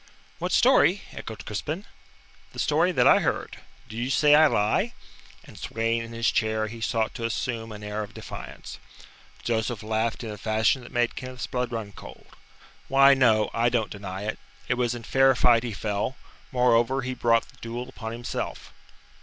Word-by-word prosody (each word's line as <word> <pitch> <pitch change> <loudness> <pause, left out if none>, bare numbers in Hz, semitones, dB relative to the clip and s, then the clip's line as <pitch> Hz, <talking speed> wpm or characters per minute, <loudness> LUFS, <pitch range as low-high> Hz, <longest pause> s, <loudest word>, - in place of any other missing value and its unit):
"What - - -2
story?" - - +4
echoed - - -8
Crispin. - - -4 0.7
"The - - -12
story - - +2
that - - +2
I - - +7
heard. - - -2 0.3
Do 110 - -10
you 120 +3 -2
say 145 +2 +4
I 155 +1 +7
lie?" 105 -6 +1 0.5
And, - - -14
swaying 115 +1 -1
in 115 0 -8
his 115 0 +1
chair, 110 -1 0
he 115 +1 -8
sought 110 0 0
to 120 - -6
assume 115 -1 -3
an 105 -1 -9
air 105 +1 -3
of 105 - -8
defiance. - - -9 0.6
Joseph 110 -1 -1
laughed 110 +2 -1
in 110 - -5
a 105 - -8
fashion 110 +5 +1
that 120 - -12
made 120 0 0
Kenneth's 130 -1 -6
blood 125 -1 -2
run 110 -3 -4
cold. - - -12 0.6
"Why, 135 +1 +6
no, 110 -5 +3
I 115 +1 +2
don't 115 -4 -1
deny 100 -1 -6
it. 110 +1 -3 0.3
It - - +2
was 120 -1 0
in 120 - -8
fair 135 +2 +4
fight 120 -2 +5
he 120 -1 -4
fell. 105 +4 -2 0.4
Moreover, 125 +1 +3
he 130 0 -3
brought 115 -2 +2
the - - -20
duel 120 +2 -5
upon 115 -4 -7
himself." 120 +1 -5
115 Hz, 180 wpm, -26 LUFS, 110-125 Hz, 0.7 s, I